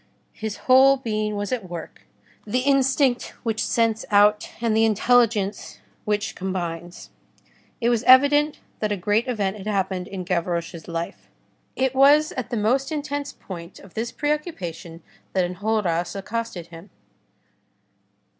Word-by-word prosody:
His 220 Hz, -2 st, -5 dB
whole 265 Hz, +1 st, +6 dB
being 215 Hz, -4 st, -2 dB
was 205 Hz, +2 st, -3 dB
at 225 Hz, -8 st, -3 dB
work, 170 Hz, -1 st, -9 dB, 0.4 s
the 250 Hz, +5 st, 0 dB
instinct 270 Hz, -1 st, +2 dB
which 225 Hz, -2 st, -1 dB
scents 225 Hz, -1 st, +1 dB
out, 210 Hz, 0 st, +4 dB
and 230 Hz, -2 st, +1 dB
the 220 Hz, -, +4 dB
intelligence 220 Hz, -2 st, +2 dB, 0.3 s
which 210 Hz, -1 st, -1 dB
combines. 175 Hz, -2 st, -5 dB, 0.7 s
It 235 Hz, -, +1 dB
was 235 Hz, -2 st, +2 dB
evident 290 Hz, +3 st, +6 dB, 0.2 s
that 215 Hz, -1 st, -1 dB
a 205 Hz, -, 0 dB
great 210 Hz, +7 st, +1 dB
event 210 Hz, -5 st, -1 dB
had 205 Hz, 0 st, -8 dB
happened 190 Hz, -3 st, -1 dB
in 190 Hz, -2 st, -6 dB
Gavroche's 170 Hz, -2 st, -2 dB
life. 170 Hz, 0 st, -5 dB, 0.5 s
It 265 Hz, 0 st, 0 dB
was 290 Hz, +3 st, +5 dB
at 255 Hz, -2 st, -5 dB
the 240 Hz, -, -2 dB
most 255 Hz, +7 st, +1 dB
intense 285 Hz, -1 st, -3 dB
point 170 Hz, -1 st, -10 dB
of 195 Hz, -, -15 dB
this 230 Hz, +1 st, -3 dB
preoccupation 195 Hz, -, -4 dB, 0.3 s
that 185 Hz, -2 st, +2 dB
Enjolras 180 Hz, -2 st, -1 dB
accosted 210 Hz, -2 st, -4 dB
him. 170 Hz, +3 st, -12 dB
215 Hz, 135 wpm, -23 LUFS, 185-255 Hz, 0.7 s, whole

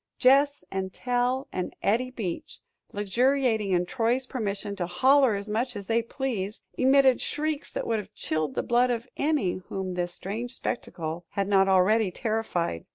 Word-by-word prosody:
Gess 280 Hz, +2 st, +4 dB
and 190 Hz, 0 st, -3 dB
Tell 250 Hz, +4 st, 0 dB
and 180 Hz, -, -3 dB
Eddie 235 Hz, +6 st, +2 dB
Beach, 210 Hz, -9 st, -5 dB, 0.3 s
luxuriating 225 Hz, +1 st, +1 dB
in 180 Hz, -1 st, +2 dB
Troy's 245 Hz, +4 st, 0 dB
permission 205 Hz, -5 st, -3 dB
to 175 Hz, -2 st, -2 dB
"holler 260 Hz, +6 st, +4 dB
as 200 Hz, +1 st, -5 dB
much 235 Hz, +4 st, -1 dB
as 200 Hz, -1 st, -6 dB
they 230 Hz, +2 st, +2 dB
pleased," 225 Hz, -5 st, -4 dB
emitted 265 Hz, 0 st, +4 dB
shrieks 305 Hz, 0 st, -2 dB
that -, -, -3 dB
would 225 Hz, -1 st, 0 dB
have 205 Hz, 0 st, -9 dB
chilled 155 Hz, -3 st, -2 dB
the -, -, 0 dB
blood 245 Hz, +1 st, +3 dB
of 240 Hz, 0 st, -2 dB
any 280 Hz, -, 0 dB
whom 190 Hz, -1 st, -3 dB
this 175 Hz, 0 st, -2 dB
strange 225 Hz, +8 st, -5 dB
spectacle 170 Hz, -8 st, -4 dB
had 200 Hz, -1 st, -2 dB
not 195 Hz, -1 st, +4 dB
already 195 Hz, +3 st, +4 dB
terrified. 185 Hz, -, -2 dB
220 Hz, 160 wpm, -27 LUFS, 190-255 Hz, 0.3 s, Gess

